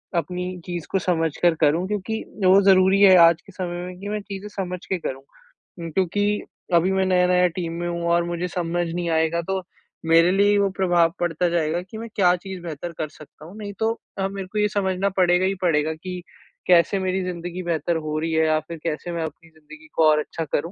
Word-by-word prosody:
अपनी 180 +2 -2
चीज़ 175 -3 -5
को 195 - +2
समझ 165 -4 0
कर 175 -2 +4
करूँ 160 +4 +3
क्योंकि 210 +2 -3 0.2
वो 190 +2 +7
ज़रूरी 190 +1 +4
है 190 -2 +8
आज 170 -1 +6
के - - -16
समय 175 -1 -5
में 180 0 -9
कि 200 +2 -6
मैं 210 0 -2
चीज़ें 200 0 -7
समझ 185 -3 -5
के 190 - -1
करूँ। 135 -4 -5 0.6
उम, 165 -1 -5
क्योंकि 205 +4 0 0.3
अभी 170 +2 +4
मैं 190 0 +1
नया-नया 180 -1 +3
टीम 170 -3 -3
में 175 - -2
हूँ 170 0 -3
और 170 0 +3
मुझे 175 +1 -3
समझ 175 -1 -2
नहीं 170 +1 -3
आएगा 160 +1 +1
तो 190 0 -1 0.4
मेरे 165 +2 +5
लिए 205 +2 +3
वो 200 -1 +2
प्रभाव 175 -3 +3
पड़ता 175 0 0
जाएगा 170 0 0
कि 185 +4 -10
मैं 230 +1 -6
क्या 180 -3 +4
चीज़ 185 0 -8
बेहतर 170 0 -6
कर 155 - -3
सकता 155 0 -15
हूँ 175 +5 -12
नहीं 205 -1 -6
तो 225 0 +2 0.3
अ, 195 0 0
मेरे 195 -1 -6
को 210 - -7
ये 210 - +3
समझना 195 -1 0
पड़ेगा 180 0 +4
ही 195 +1 0
पड़ेगा 160 -3 +1
कि 180 +3 -7 0.5
कैसे 180 +2 +4
मेरी 185 0 -1
ज़िंदगी 175 0 -5
बेहतर 170 0 -1
हो 155 0 -2
रही 165 +1 -2
है 160 0 +3
या 155 0 +2
फ़िर 165 +2 -9
कैसे 165 +1 -3
मैं 170 -1 -2
अपनी 160 +1 -8
ज़िंदगी 155 0 -16
को 160 - +4
और 150 0 +4
अच्छा 160 +2 -4
करूँ। 155 +3 -2
175 Hz, 220 wpm, -23 LUFS, 165-190 Hz, 0.6 s, है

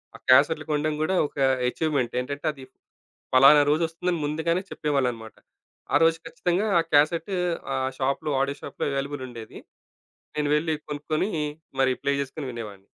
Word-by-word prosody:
ఆ - - -8
క్యాసెట్‌లు 150 +4 +5
కొనడం‌ 150 +1 0
గూడా 185 +5 +1
ఒక - - -21 0.3
ఏ‌చీవ్‌మేం‌ట్ 140 -3 -1
ఏంటంటే 140 +4 -5
అది 135 -2 -12 0.7
పలానా 135 +3 +8
రోజొస్తుందని 165 +2 0
ముందుగానే 160 +4 0
చెప్పేవాళ్ళన్నమాట. 125 -7 -2 0.6
ఆ - - +6
రోజు 165 0 +4
ఖచ్చితంగా 175 +5 -1
ఆ - - 0
క్యాసెట్ 155 +6 +3 0.4
ఆహ్, 130 0 -1
షాప్‌లో 140 +3 -1
ఆడియో 140 +1 -2
షాప్‌లో - - -4
అవైలబుల్‌ 140 0 -3
ఉండేది. 115 -3 -10 0.8
నేను 150 -1 0
వెళ్లి 160 +1 0 0.2
కొనుక్కొని‌ 155 +6 -2 0.5
మరి 130 -1 +3
ప్లే 140 - +1
జేసుకొని 140 +1 -6
వినేవాడిని. 105 -5 -8
145 Hz, 140 wpm, -25 LUFS, 130-160 Hz, 0.8 s, పలానా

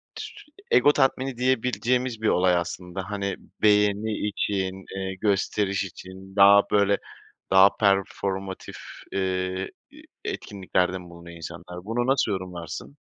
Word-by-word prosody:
tü - - -5
sü - - -11 0.3
ego 145 - +6
tatmini 135 -2 +1
diyebileceğimiz 125 -1 0
bir 110 - +1
olay 90 0 +3
aslında. 90 +2 -4
Hani, 100 -1 -2 0.3
beğeni 105 0 +3
için, 95 -2 -2
eee, 95 0 -3
gösteriş 100 0 0
için 95 0 -10
daha, 100 0 +8
böyle, 100 -1 +4 0.5
daha 95 +1 +8
performative 95 -1 -1 0.3
eee, 95 0 -2 0.2
iii, - - -15 0.2
etkinliklerde 95 -2 -1
mi 90 - -10
bulunuyor 85 0 -11
insanlar? 90 +2 -9
Bunu 120 +3 -1
nasıl 135 -5 +2
yorumlarsın? 85 -7 -6
100 Hz, 125 wpm, -25 LUFS, 95-105 Hz, 0.5 s, daha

